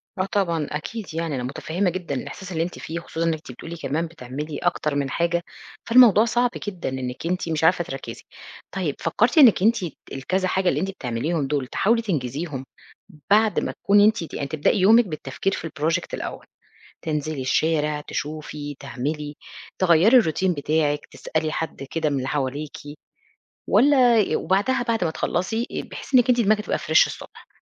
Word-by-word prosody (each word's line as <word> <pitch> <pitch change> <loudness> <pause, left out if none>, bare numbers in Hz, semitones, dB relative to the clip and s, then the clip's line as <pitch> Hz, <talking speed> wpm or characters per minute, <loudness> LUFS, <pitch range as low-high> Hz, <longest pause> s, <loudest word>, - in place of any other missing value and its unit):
آه 185 -2 0
طبعًا، 170 -7 0
أكيد 190 +7 -5
يعني 165 -3 -2
أنا 125 - -3
مُتفهِّمة 165 +8 -1
جدًا 175 -5 -4
الإحساس 185 +8 -7
اللي 165 -2 0
أنت 175 - -6
فيه، 165 +2 -5
خصوصًا 165 0 -4
إن 165 - +2
أنت 155 -3 -8
بتقولي 165 +7 -8
كمان 160 +1 -2
بتعملي 150 0 -6
أكتر 150 +1 -1
من 140 -1 -1
حاجة، 170 +2 0 0.4
فالموضوع 230 -3 +7
صعب 240 +2 +2 0.2
جدًا 185 -7 -3
إنِّك 130 +1 -5
أنت 180 -1 -2
مش 160 -1 -1
عارفة 175 +2 +4
تركزي. 135 -6 -8 0.5
طيب، 175 -7 -2
فكّرتِ 230 - +1
إنِّك 245 -10 +7
أنتِ 225 +3 +5 0.4
الكذا 185 +8 -1
حاجة 185 0 +1
اللي - - 0
أنتِ 195 - -1
بتعمليهم 140 +1 -2
دُول، 140 -3 -1
تحاولي 230 - +2
تنجزيهم 145 - -3 0.7
بعد 215 0 +4
ما - - -2
تكوني 205 +1 +6
أنتِ 220 -5 +2
ت - - -10
يعني 140 - -3
تبدئي 155 +7 +1
يومِك 225 +5 +6
بالتفكير 155 +3 -3
في 165 - -4
الproject 165 +3 -1
الأول؟ - - -5 0.6
تنزلي 150 -3 -2
الشارع، 150 +2 +1
تشوفي، 150 -1 -5
تعملي، 145 +2 -4 0.4
تغيّري 185 +7 +5
الروتين 185 -2 +1
بتاعِك، 145 0 0
تسألي 155 -1 -3
حد 160 -3 -4
كده 160 -2 0
من 140 - -1
اللي 130 0 -2
حواليكِ 145 +1 -3 0.9
والّا 255 -4 +5
ي 210 - +1
وبعدها 240 +7 +1
بعد 230 -4 0
ما 160 - 0
تخلّصي 205 +9 -1
آآ - - -3
بحيث - - -5
إنِّك 250 0 +5
أنتِ 245 -1 +4
دماغِك 210 0 +3
تبقى - - -1
fresh - - +4
الصبح. - - -11
165 Hz, 170 wpm, -23 LUFS, 145-195 Hz, 0.9 s, فالموضوع